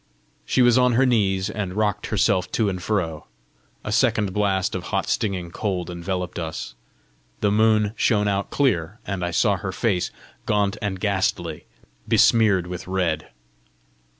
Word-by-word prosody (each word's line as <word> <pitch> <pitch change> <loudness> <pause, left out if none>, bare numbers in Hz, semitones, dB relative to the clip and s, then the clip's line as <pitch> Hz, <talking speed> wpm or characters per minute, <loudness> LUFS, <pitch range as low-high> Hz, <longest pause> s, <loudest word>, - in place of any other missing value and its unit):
She 130 - +3
was 120 +1 +5
on 125 -1 +3
her 130 +3 +4
knees, 95 -6 +2
and 95 -4 -4
rocked 105 -1 0
herself 100 -3 +1
to 110 -3 +2
and 90 -2 -4
fro. 90 -6 -2 0.6
A 105 - -4
second 110 -4 +2
blast 95 -2 0
of 90 -2 -4
hot - - -1
stinging 95 -5 -1
cold 90 -3 -3
enveloped 90 0 -4
us; 80 -6 -5 0.7
the 105 - +2
moon 110 0 +3
shone 105 -2 +2
out 100 0 -1
clear, 105 - 0
and 95 -3 -3
I 85 - -1
saw 100 +3 +2
her 95 0 -4
face 95 -2 0 0.4
gaunt 105 -2 +1
and 100 -3 -3
ghastly, 95 -5 -1 0.4
besmeared 105 -6 +4
with 90 +1 -7
red. 90 -5 -1
100 Hz, 150 wpm, -23 LUFS, 90-105 Hz, 0.7 s, was